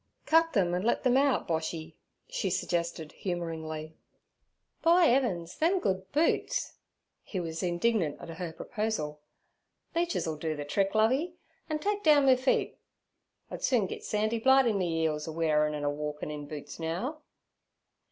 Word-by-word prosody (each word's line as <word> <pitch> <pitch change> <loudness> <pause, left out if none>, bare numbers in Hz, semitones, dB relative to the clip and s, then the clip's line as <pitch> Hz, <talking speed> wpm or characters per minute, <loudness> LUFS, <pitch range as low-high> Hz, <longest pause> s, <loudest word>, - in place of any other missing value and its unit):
'Cut 330 +1 +4
them 180 -6 +2
and 180 +1 0
let 235 - +1
them 250 -1 +3
out, 275 0 +3
Boshy' 160 0 -3 0.3
she 195 - -2
suggested 170 -3 -2
humouringly. 160 -3 -4 0.9
'By 340 +1 +5
'eavens! 195 -10 +1
them 350 +4 +3
good 190 - -2
boots.' 335 - +1 0.5
He 190 - -5
was 165 -2 -4
indignant 175 -2 0
at - - -9
her 165 0 -5
proposal. 160 -6 -3 0.7
'Leeches 345 +1 0
'll 160 -2 -3
do 155 0 -3
ther 145 - -3
trick, 195 +7 0
Lovey, 265 +11 +2 0.3
an' 310 - 0
take 410 +6 -1
down 295 -5 +5
me 260 -1 +7
feet. 255 +1 0 0.7
I'd - - -6
soon 240 -6 +2
git - - -6
sandy 215 +2 0
blight 265 +3 +5
in 215 -4 +1
me 165 -3 0
'eels 150 -1 -1
a - - -3
wearin' 150 -2 +1
an' 145 - -4
a 145 - +1
walkin' 150 0 -4
in 145 -1 -6
boots 145 -1 -8
now.' 185 - -3
180 Hz, 160 wpm, -29 LUFS, 160-255 Hz, 0.9 s, me